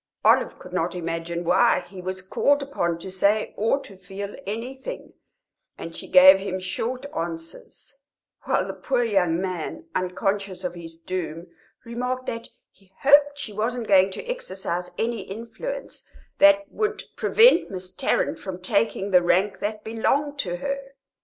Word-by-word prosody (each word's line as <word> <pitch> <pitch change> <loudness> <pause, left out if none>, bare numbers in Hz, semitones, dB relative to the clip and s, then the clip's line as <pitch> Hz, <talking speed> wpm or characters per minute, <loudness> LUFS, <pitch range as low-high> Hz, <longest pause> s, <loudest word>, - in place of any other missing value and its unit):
Olive - - +4
could 180 - -12
not 180 0 -1
imagine 170 0 -3
why 175 - +4
he 190 -2 -10
was 185 +1 -5
called 285 +9 +2
upon 175 -12 -1
to 185 +3 -8
say 200 +3 +1
or 225 +6 +1
to 200 - -13
feel 195 +2 -7
anything, 260 - -6 0.6
and - - -7
she - - -8
gave 275 -5 +8
him 190 -1 -3
short 240 +8 -3
answers; 165 +10 -7 0.5
while - - +1
the - - -5
poor 255 -3 0
young 185 -7 +2
man, 185 - -4
unconscious 190 +1 -2
of 180 -1 -2
his 165 -1 -9
doom, 170 -2 -4 0.4
remarked 250 +2 -3
that 230 -1 -5 0.2
he 190 -1 -27
hoped 285 +1 +6
she 230 -7 -6
wasn't 230 +3 -2
going 190 -1 +5
to 190 - -7
exercise 190 - -4
any 230 0 -1
influence 235 - -7 0.4
that 295 0 +6
would 430 0 -2
prevent 455 -5 +5
Miss 185 -1 -6
Tarrant 165 - 0
from 185 -2 -6
taking 200 +1 0
the 180 -1 +6
rank 185 +3 +2
that 215 +1 -3
belonged 280 +6 0
to 175 -8 -1
her. 275 +6 -4
200 Hz, 155 wpm, -24 LUFS, 180-255 Hz, 0.6 s, gave